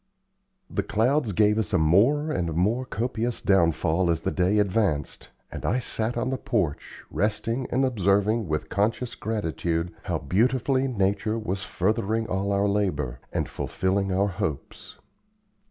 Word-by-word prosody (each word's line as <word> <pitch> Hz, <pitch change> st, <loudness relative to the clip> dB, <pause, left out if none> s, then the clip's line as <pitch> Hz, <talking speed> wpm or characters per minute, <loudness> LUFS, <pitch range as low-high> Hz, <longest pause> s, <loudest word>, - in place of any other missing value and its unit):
The -, -, -1 dB
clouds 120 Hz, +3 st, +1 dB
gave 105 Hz, +3 st, +3 dB
us 105 Hz, -, -2 dB
a -, -, +5 dB
more 115 Hz, -, +3 dB
and 85 Hz, -, -1 dB
more 110 Hz, +9 st, +1 dB
copious 120 Hz, 0 st, -2 dB
downfall 85 Hz, -1 st, +2 dB
as 80 Hz, -1 st, +1 dB
the -, -, -1 dB
day 95 Hz, +3 st, +2 dB
advanced, 100 Hz, -8 st, 0 dB, 0.2 s
and -, -, -7 dB
I -, -, +1 dB
sat 120 Hz, -1 st, -2 dB
on 130 Hz, +2 st, -1 dB
the 130 Hz, -, -2 dB
porch, 90 Hz, -, -2 dB
resting 110 Hz, +4 st, -1 dB
and 130 Hz, +2 st, +2 dB
observing 105 Hz, -1 st, +1 dB
with 75 Hz, -1 st, -2 dB
conscious 115 Hz, +5 st, -1 dB
gratitude 85 Hz, -5 st, -2 dB
how -, -, 0 dB
beautifully 130 Hz, +5 st, +1 dB
nature 105 Hz, -1 st, 0 dB
was 100 Hz, -3 st, -3 dB
furthering 110 Hz, +3 st, 0 dB
all 95 Hz, +2 st, -1 dB
our 100 Hz, +1 st, +2 dB
labor, 75 Hz, -12 st, -1 dB
and -, -, -1 dB
fulfilling 95 Hz, +1 st, -1 dB
our 95 Hz, +2 st, +2 dB
hopes. 80 Hz, -6 st, -5 dB
100 Hz, 145 wpm, -26 LUFS, 90-115 Hz, 0.2 s, a